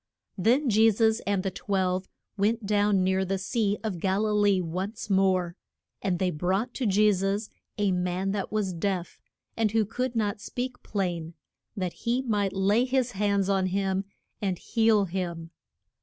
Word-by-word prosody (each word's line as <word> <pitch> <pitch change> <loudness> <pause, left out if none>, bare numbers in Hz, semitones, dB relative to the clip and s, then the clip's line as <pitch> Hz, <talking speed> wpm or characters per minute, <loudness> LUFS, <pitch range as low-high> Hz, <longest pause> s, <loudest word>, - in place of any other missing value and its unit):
Then 245 +9 +2
Je 220 0 +5
sus 220 +1 +2
and 200 -2 +1
the 195 - -1
twelve 185 -2 -1 0.3
went 215 +2 0
down 205 -2 +2
near 190 +1 +2
the 195 +1 -1
Sea 205 +1 0
of 205 -6 -3
Gal 195 +4 +1
i 215 - 0
lee 205 -2 +3
once 185 +5 -4
more. 185 -3 +2 0.5
And 185 -3 0
they 185 0 0
brought 190 +10 -1
to 255 - -1
Je 210 +2 +4
sus 195 +3 -1 0.3
a 205 -2 +2
man 180 +1 -1
that 200 -1 -3
was 210 -3 -1
deaf, 180 0 -3 0.3
and 225 -2 +2
who 225 -1 +3
could 250 +4 -3
not 210 -1 -1
speak 250 +3 -5
plain, 175 -5 -3 0.4
that 185 -3 -2
he 245 +3 -1
might 205 -5 0
lay 200 +5 +3
his 260 -1 0
hands 200 -2 +1
on 195 -1 +2
him 190 0 0 0.4
and 190 -3 -1
heal 220 -2 +2
him. 170 -2 -4
200 Hz, 170 wpm, -27 LUFS, 185-215 Hz, 0.5 s, Je